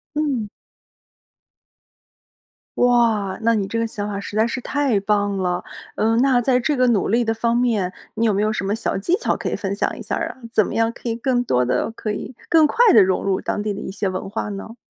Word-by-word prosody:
嗯。 280 -8 -1 2.3
哇， 230 -6 +2
那 230 +1 +4
你 205 -3 0
这 230 - -3
个 230 - +1
想 210 -2 -4
法 200 -1 -3
实 200 - -7
在 220 +1 +3
是 245 - -3
太 270 -5 0
棒 205 0 0
了！ 180 -1 -1 0.3
嗯， 225 +1 +2
那 260 -3 +3
在 250 +1 +2
这 290 +4 0
个 255 -1 +3
努 225 -5 +2
力 235 +4 +2
的 225 - 0
方 230 +1 0
面， 220 -7 +1 0.2
你 230 - +1
有 215 - +3
没 200 - 0
有 215 +1 +1
什 215 - -3
么 195 +1 -1
小 225 - -2
技 270 - +1
巧 - - 0
可 - - -5
以 - - -1
分 195 -1 -3
享 - - -1
一 - - -8
下 - - -3
儿 - - -2
呀？ - - -10
怎 215 -3 +3
么 - - -5
样 225 0 +1
可 240 - -10
以 225 - -1
更 245 +1 0
多 125 - +1
地 125 - 0
可 220 -1 -4
以 220 +4 -6
更 325 -2 +6
快 300 - -2
地 215 - +7
融 185 0 0
入 195 -1 0
当 - - -2
地 210 -1 -2
的 - - -6
一 210 - -6
些 195 0 -2
文 185 +1 -4
化 210 +1 -4
呢？ 205 +3 -7
220 Hz, 260 characters per minute, -21 LUFS, 200-240 Hz, 2.3 s, 地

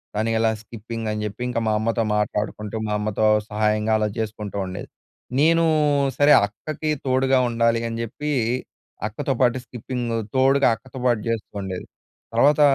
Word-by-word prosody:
తను 110 +2 0
ఎలా 110 0 +3
స్కిప్పింగ్ 115 0 -6
అని 105 0 -3
చెప్పి, 105 +3 -6
ఇంకా 115 - -1
మా 110 - +2
అమ్మతో 115 +1 0
మాట్లాడుకుంటూ, 105 0 -2
మా 105 - -1
అమ్మతో 110 0 0 0.2
సహాయంగా 105 +1 +1
అలా 105 0 +1
చేసుకుంటూ 105 -2 -4
ఉండేది. 95 - -7 0.5
నేను 165 +3 +4 0.5
సరే 145 +1 +5
అక్కకి 150 +9 -5 0.2
తోడుగా 130 0 +3
ఉండాలి 115 0 +2
అని 115 0 -4
చెప్పి 150 +6 -4 0.8
అక్కతో 110 +5 -2
పాటు 125 0 +4
స్కిప్పింగ్, 120 0 -4 0.3
తోడుగా 135 +1 +4
అక్కతో 130 +3 -11
పాటు 120 -4 +3
చేస్తూ 115 -2 -2
ఉండేది. 95 -2 -5 0.5
తర్వాత 145 +6 +4
115 Hz, 145 wpm, -23 LUFS, 105-130 Hz, 0.8 s, సరే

